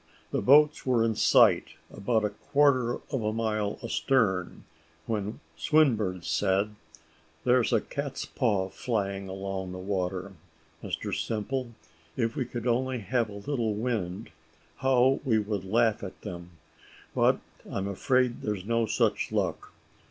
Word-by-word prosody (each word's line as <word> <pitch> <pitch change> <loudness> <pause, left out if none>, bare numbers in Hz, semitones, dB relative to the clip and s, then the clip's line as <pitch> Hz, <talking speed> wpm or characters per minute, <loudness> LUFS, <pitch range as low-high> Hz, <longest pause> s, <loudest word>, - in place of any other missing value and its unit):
The - - 0
boats 150 +3 +5
were 125 -3 +2
in 115 - +1
sight, - - +4 0.2
about 110 +1 0
a 105 - -1
quarter 130 +1 +2 0.2
of 135 -5 -1
a 105 - +1
mile 110 -2 -1
astern, 115 -6 0 0.4
when 105 +3 -3
Swinburne 110 - +2
said, 100 +3 +1 0.7
"There's 125 0 +3
a 115 -3 +3
cat's 140 -1 -4
paw 100 -7 0
flying 100 -4 -2
along 95 -1 -4
the - - -6
water, 95 0 -3 0.5
Mr - - -4
Simple; 120 +3 -2 0.4
if 115 -2 0
we 130 - -1
could 120 -1 -6
only 130 +2 +1
have 115 +2 0
a 100 -1 -9
little 120 -7 0
wind, 105 -3 -3 0.5
how 130 0 +3
we 120 -6 +2
would 105 -2 -2
laugh 110 +2 +2
at 95 - -7
them; 85 -1 -7 0.6
but - - +3 0.3
I'm 95 0 -2
afraid 125 +5 +1
there's 105 -3 -3
no 115 0 +1
such 105 - +1
luck. - - -2
110 Hz, 135 wpm, -28 LUFS, 100-125 Hz, 0.7 s, boats